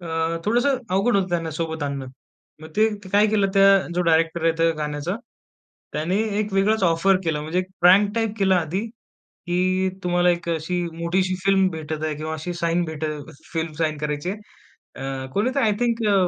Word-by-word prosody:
अ, 175 - -9 0.4
थोडंसं 245 +5 +2
अवघड 200 +4 +2
होतं 190 -1 +1
त्यांना 165 -2 -1
सोबत 160 0 -4
आणणं. 140 -2 -3 0.6
मग 160 - -9
ते 215 - +5 0.3
काय 205 +1 +5
केलं? 205 -2 +2
त्या, 195 0 +6 0.3
जो 180 - +1
डायरेक्टर 165 +1 +2
आहे 165 - +4
त्या 165 0 +4
गाण्याचा, 150 +4 -3 0.8
त्याने 165 +6 -1 0.2
एक 210 -2 -3
वेगळाच 200 +2 +2
ऑफर 185 +4 +3
केला, 155 -2 0
म्हणजे 160 +4 -1 0.2
प्रँक 195 +4 +6
टाइप 225 -2 0
केला 190 -2 +3
आधी, 175 +3 -1
की 185 -4 -3 0.2
तुम्हाला 175 0 +3
एक 170 0 -2
अशी 165 +2 -1 0.2
मोठीशी 185 +2 0
फिल्म 195 -1 +4
भेटत 155 -1 -5
आहे, 155 - -1
किंवा 155 +1 -4
अशी 160 +3 -5
साइन 170 0 0
भेट 160 -1 -5 0.5
फिल्म 165 -1 -2
साइन 155 -2 0
करायची 150 +4 -2
आहे. 210 - -5 0.6
अ, 135 -1 -4
कोणीतरी 255 +6 +1
आय 215 - +3
थिंक 235 -1 +1
अ, 205 - +4
175 Hz, 175 wpm, -23 LUFS, 160-195 Hz, 0.8 s, त्या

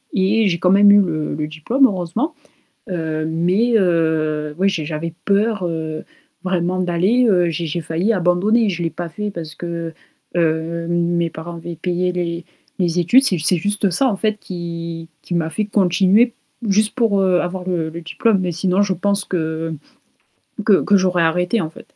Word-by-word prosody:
et 205 +2 +2
j'ai 170 -3 0
quand 180 - +3
même 200 +1 +7
eu 205 - +7
le 155 -6 -2
le 150 0 -3
diplôme 195 - +2
heureusement, 205 - -2 0.6
heu, 160 -3 -2
mais 180 +9 +1
heu, 160 -4 0
oui 195 +2 +3
j'ai 170 -6 -2
j'avais 160 +1 -4
peur, 205 -1 +1
heu, 160 -2 -4 0.4
vraiment 185 0 0
d'aller, 185 +8 +2
heu, 180 -3 +3
j'ai 165 +1 -3
j'ai 170 +3 -3
failli 165 +8 0
abandonner, 200 +4 +2
je 175 -2 -4
l'ai 165 - -1
pas 175 0 -6
fait 210 +5 -4
parce 165 -4 -7
que, 170 -1 -5 0.4
heu, 165 0 0
mes 170 -1 0
parents 170 +2 -8
avaient 170 0 -7
payé 180 +2 -1
les 170 -1 -3 0.3
les 175 -1 +1
études, 245 +11 +5
c'est 185 -9 +1
c'est 170 +4 +2
juste 205 +2 0
ça 225 +10 +1
en 205 - -1
fait 215 +1 0
qui 170 -2 -6
qui 175 - -5
m'a 160 -1 0
fait 210 +6 -1
continuer 195 +2 +3
p 235 - -22 0.3
juste 215 +2 +2
pour, 225 -6 +2
heu, 185 -2 +3
avoir 180 +1 -5
le 170 -3 -1
le 170 +2 -7
diplôme, 200 +5 +1
mais 180 -2 -2
sinon 185 +3 +1
je 200 -2 +1
pense 200 +3 0
que 160 -2 -3 0.9
que 205 -3 +5
que 205 -1 +4
j'aurais 180 -2 +1
arrêté 180 +6 +1
en 160 - -3
fait. - - -13
175 Hz, 185 wpm, -19 LUFS, 165-200 Hz, 0.9 s, même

